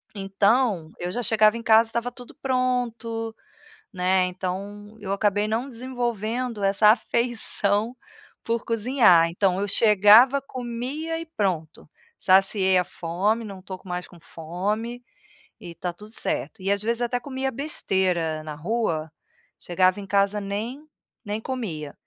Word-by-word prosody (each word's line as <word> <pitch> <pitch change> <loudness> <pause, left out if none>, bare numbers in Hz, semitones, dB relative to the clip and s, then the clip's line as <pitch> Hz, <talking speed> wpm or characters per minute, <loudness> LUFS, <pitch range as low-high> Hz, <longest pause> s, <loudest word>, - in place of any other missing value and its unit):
Então 200 -2 +1
eu 175 +1 -4
já 245 +6 -3
chegava 215 0 +3
em 230 - -8
casa 225 0 +5
estava 235 +1 -2
tudo 245 -1 -13
pronto, 240 -3 -1 0.6
né, 185 0 +2
então 200 +4 -6
eu 195 -1 -4
acabei 205 +1 +1
não 230 +5 -1
desenvolvendo 240 -2 -3
essa 195 +2 +4
afeição 230 -1 +1 0.5
por 230 0 -1
cozinhar. 225 -7 +4
Então 185 +2 +1
eu 205 - -1
chegava 220 +6 +6
comia 260 +6 -4
e 330 - -7
pronto, 175 -6 -2 0.3
saciei 190 0 +3
a 180 - +2
fome, 195 +9 -1
não 200 -3 -8
estou 185 0 -8
com 185 - -16
mais 180 0 -4
com 175 - -16
fome, 205 +10 -4 0.6
e - - -9
está 170 +1 -5
tudo 210 +5 -13
certo. 225 -1 -2
E 195 - -1
às 200 0 -1
vezes 235 +2 -1
até 245 +1 -1
comia 265 +1 -3
besteira 185 - -1
na 155 -1 -6
rua, 165 -3 -2 0.5
chegava 185 +2 +2
em 195 - -8
casa 200 +1 +1
nem 220 +9 -4 0.4
nem 210 +1 -3
comia. 185 - -5
210 Hz, 140 wpm, -24 LUFS, 185-235 Hz, 0.6 s, chegava